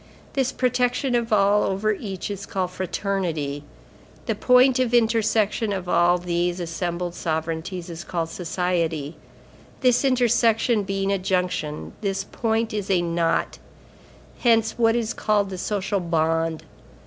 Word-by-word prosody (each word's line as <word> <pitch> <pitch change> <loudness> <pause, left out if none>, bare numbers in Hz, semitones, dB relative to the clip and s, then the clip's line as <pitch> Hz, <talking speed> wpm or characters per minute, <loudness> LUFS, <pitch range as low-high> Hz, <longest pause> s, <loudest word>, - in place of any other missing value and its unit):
This 265 -2 +1
protection 250 +1 0
of 235 -1 0
all 205 0 +4
over 195 +3 0
each 195 -1 -5
is 200 0 -6
called 185 -2 -2
Fraternity. 175 -6 -2 0.6
The - - 0
point 250 +1 +4
of 245 -2 +2
intersection 225 -2 +2
of 190 -2 -3
all 175 0 +4
these 175 0 -1
assembled 175 +1 -3
sovereignties 165 +2 -3
is 170 -1 -7
called 165 -2 -3
society. 170 -3 -2 0.7
This 250 0 +3
intersection 240 -3 +3
being 195 0 -1
a 195 - +1
junction, 180 -5 -2
this 195 -2 -1
point 225 +1 -1
is 205 -2 -3
a 180 -3 +2
knot. 170 -1 0 0.8
Hence 225 -2 +3
what 230 -1 +3
is 235 -1 -1
called 205 -2 0
the 185 - -5
social 200 0 -1
bond. 165 -1 0
195 Hz, 135 wpm, -23 LUFS, 175-225 Hz, 0.8 s, all